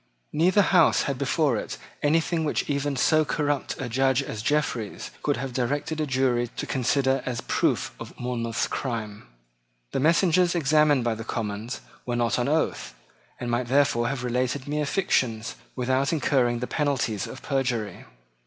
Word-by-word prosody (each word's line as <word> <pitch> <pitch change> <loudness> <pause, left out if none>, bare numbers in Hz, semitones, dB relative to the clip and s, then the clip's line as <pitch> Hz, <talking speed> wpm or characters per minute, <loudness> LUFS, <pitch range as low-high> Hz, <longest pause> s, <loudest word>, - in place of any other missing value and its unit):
Neither 185 +6 +4
House 180 -4 +4
had 135 -2 -2
before 140 -2 +1
it - - -5 0.2
anything 160 +2 +2
which 150 - -1
even 140 -1 -1
so 155 +4 +3
corrupt 145 -2 -1
a 135 - -3
judge 130 +2 +2
as 110 -5 -5
Jeffreys 120 -5 -1
could 145 - 0
have 135 -2 -4
directed 145 +5 -1
a 155 - -1
jury 130 -2 +1
to - - -2
consider 130 +1 +1
as 125 -2 -3
proof - - 0
of - - -10
Monmouth's 115 -2 -1
crime. 110 - -4 0.6
The - - -1
messengers 170 +3 +3
examined 150 -3 +3
by 120 -1 +1
the 110 +1 -6
Commons 110 +1 -4 0.2
were 120 - -2
not 120 0 +1
on 120 - 0
oath, 145 - -1 0.4
and 120 -1 -3
might 120 +1 0
therefore 125 -3 +3
have 130 -1 -3
related 125 +2 -1
mere 150 0 -1
fictions 125 - 0 0.2
without 130 +2 +1
incurring 130 -6 +1
the - - 0
penalties 130 -9 -1
of 130 - -9
perjury. 125 -8 -2
130 Hz, 160 wpm, -26 LUFS, 120-150 Hz, 0.6 s, Neither